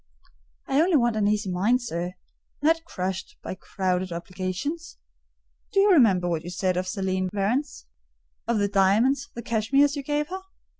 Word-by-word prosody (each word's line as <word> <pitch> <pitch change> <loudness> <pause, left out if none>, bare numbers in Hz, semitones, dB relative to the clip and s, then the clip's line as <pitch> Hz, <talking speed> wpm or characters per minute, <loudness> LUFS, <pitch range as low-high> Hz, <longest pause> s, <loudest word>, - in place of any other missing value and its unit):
"I 275 +2 +3
only 345 +1 +3
want 240 -3 +2
an 210 -1 +2
easy 210 -2 0
mind, 205 +8 +2
sir; 175 -4 -3 0.5
not 325 +3 +2
crushed 185 - -4
by - - -4
crowded 185 -1 -2
obligations. 185 - -4 0.7
Do 395 - +2
you 405 +1 +5
remember 205 - +5
what 165 -2 -1
you 175 - -6
said 185 +1 -1
of 180 +1 -1
Céline 185 -2 -1
Varens?—of 230 +1 -4
the 205 -1 +2
diamonds, 215 +9 +2
the 235 - -6
cashmeres 275 +7 +2
you 285 - -3
gave 295 +2 -1
her? 375 +1 -5
210 Hz, 155 wpm, -25 LUFS, 185-280 Hz, 0.7 s, you